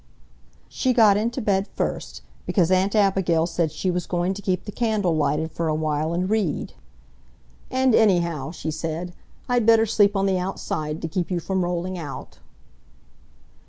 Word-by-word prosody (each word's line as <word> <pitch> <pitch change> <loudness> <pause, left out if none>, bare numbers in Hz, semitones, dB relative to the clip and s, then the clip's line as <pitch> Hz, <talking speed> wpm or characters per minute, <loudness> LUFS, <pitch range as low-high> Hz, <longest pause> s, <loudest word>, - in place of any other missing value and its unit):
She 255 - 0
got 220 -4 +6
into 235 +5 -1
bed 200 -1 +1
first, - - -4 0.2
because 180 -4 +2
Aunt 190 +3 +2
Abigail 190 -5 +2
said 170 -2 -1
she 180 +4 -1
was 175 -1 -3
going 175 +1 0
to 200 - -8
keep 180 -2 -1
the - - -6
candle 210 -7 0
lighted 150 +1 0
for 165 0 -2
a 155 - +1
while 155 0 -1
and 180 +2 -1
read. 205 -6 -1 1.0
"And 260 -1 +2
anyhow," 170 -10 +2
she 160 -1 -5
said, 165 +3 -4 0.3
"I'd 245 -3 +1
better 225 -1 +6
sleep 205 -1 +3
on 195 0 +1
the 190 -2 +1
outside 160 -4 -4
to - - -1
keep 175 +2 -2
you 180 -2 -1
from 190 +2 -1
rolling 180 +1 -3
out." 140 - -8
180 Hz, 165 wpm, -23 LUFS, 165-205 Hz, 1.0 s, got